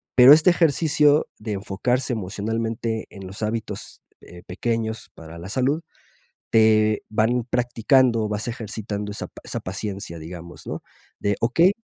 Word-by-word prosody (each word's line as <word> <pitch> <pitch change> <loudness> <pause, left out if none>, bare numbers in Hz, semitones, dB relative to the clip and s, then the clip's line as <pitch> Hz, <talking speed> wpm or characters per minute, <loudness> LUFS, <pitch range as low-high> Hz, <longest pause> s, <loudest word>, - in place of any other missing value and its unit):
Pero 125 +3 +10
este 155 +4 +6
ejercicio 155 -2 +3
de 105 0 -4
enfocarse 125 +7 -1
emocionalmente 110 +2 -3
en 100 -1 -10
los 95 +4 -9
hábitos, 110 +1 -4 0.2
eh, 90 0 -13
pequeños 110 +3 -3
para 80 +1 -11
la 85 - -8
salud, 130 +8 0 0.7
te 110 -1 +4
van 115 +3 +1
practicando, 120 -1 +2
vas 105 +2 -3
ejercitando 105 -3 -4
esa 105 - -5
pa - - -15
esa - - -4
paciencia, 95 -2 -5
digamos, 85 +2 -9
¿no?, - - -5 0.4
de 100 0 0
okey, 165 - +4
110 Hz, 135 wpm, -23 LUFS, 100-125 Hz, 0.7 s, Pero